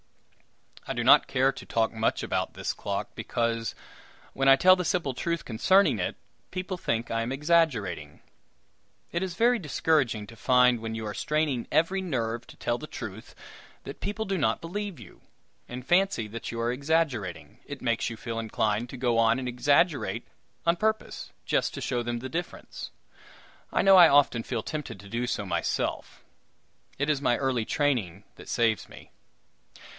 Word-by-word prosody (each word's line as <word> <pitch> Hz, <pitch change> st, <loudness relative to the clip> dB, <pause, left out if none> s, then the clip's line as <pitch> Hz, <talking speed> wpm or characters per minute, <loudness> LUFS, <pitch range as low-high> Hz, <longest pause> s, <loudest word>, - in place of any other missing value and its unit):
I -, -, -2 dB
do -, -, -2 dB
not -, -, +7 dB
care 130 Hz, +1 st, +2 dB
to -, -, -11 dB
talk 115 Hz, 0 st, 0 dB
much 110 Hz, 0 st, 0 dB
about -, -, -2 dB
this -, -, -2 dB
clock; -, -, -4 dB
because 115 Hz, -1 st, -2 dB, 0.6 s
when 135 Hz, 0 st, +2 dB
I 135 Hz, -, +9 dB
tell 185 Hz, +7 st, +6 dB
the 180 Hz, -, -2 dB
simple 165 Hz, -7 st, 0 dB
truth 170 Hz, +4 st, -2 dB
concerning 140 Hz, -, +3 dB
it, 90 Hz, -, -2 dB, 0.3 s
people 185 Hz, +1 st, -4 dB
think 115 Hz, -9 st, -2 dB
I 115 Hz, 0 st, 0 dB
am 115 Hz, +2 st, -3 dB
exaggerating. 135 Hz, -, +1 dB, 0.9 s
It 170 Hz, -, -1 dB
is 185 Hz, -3 st, -3 dB
very 240 Hz, +3 st, +3 dB
discouraging 145 Hz, -, +1 dB
to 115 Hz, -, -13 dB
find, 125 Hz, +4 st, +4 dB
when 110 Hz, 0 st, -5 dB
you 110 Hz, 0 st, -4 dB
are 105 Hz, -, -4 dB
straining 150 Hz, -2 st, -1 dB
every 185 Hz, +4 st, +2 dB
nerve 120 Hz, -9 st, -2 dB
to -, -, -14 dB
tell 120 Hz, 0 st, -1 dB
the 155 Hz, -, -7 dB
truth, 105 Hz, -5 st, -8 dB, 0.5 s
that -, -, -9 dB
people 210 Hz, +3 st, -3 dB
do 195 Hz, -3 st, -1 dB
not 140 Hz, -, +1 dB
believe 195 Hz, +2 st, -5 dB
you, -, -, -14 dB, 0.5 s
and 125 Hz, +1 st, -7 dB
fancy 175 Hz, -, +2 dB
that 115 Hz, +2 st, -6 dB
you 115 Hz, -, -5 dB
are 115 Hz, +1 st, 0 dB
exaggerating. 125 Hz, -, -1 dB
It 145 Hz, -2 st, -8 dB
makes 115 Hz, -2 st, 0 dB
you 115 Hz, -, -7 dB
feel 115 Hz, 0 st, -4 dB
inclined 110 Hz, +1 st, -1 dB
to 130 Hz, -, -8 dB
go 120 Hz, -2 st, +1 dB
and 115 Hz, +3 st, +2 dB
exaggerate 145 Hz, +6 st, +1 dB, 0.4 s
on 170 Hz, 0 st, +4 dB
purpose, 220 Hz, +3 st, -2 dB
just -, -, 0 dB
to -, -, -5 dB
show 120 Hz, -, -1 dB
them 120 Hz, 0 st, -3 dB
the 130 Hz, -, -5 dB
difference. 175 Hz, +6 st, -6 dB, 0.8 s
I -, -, +2 dB
know 195 Hz, -1 st, +7 dB
I 175 Hz, -3 st, +9 dB
often 140 Hz, -4 st, +4 dB
feel 115 Hz, -1 st, -3 dB
tempted 150 Hz, -10 st, -5 dB
to 100 Hz, -, -12 dB
do 120 Hz, +3 st, -2 dB
so -, -, -2 dB
myself -, -, -2 dB, 0.7 s
it 145 Hz, -, 0 dB
is 150 Hz, -2 st, +1 dB
my 120 Hz, -4 st, +2 dB
early 130 Hz, -4 st, 0 dB
training 110 Hz, -, 0 dB
that -, -, -12 dB
saves 115 Hz, -2 st, +1 dB
me. -, -, -14 dB
130 Hz, 175 wpm, -27 LUFS, 115-165 Hz, 0.9 s, I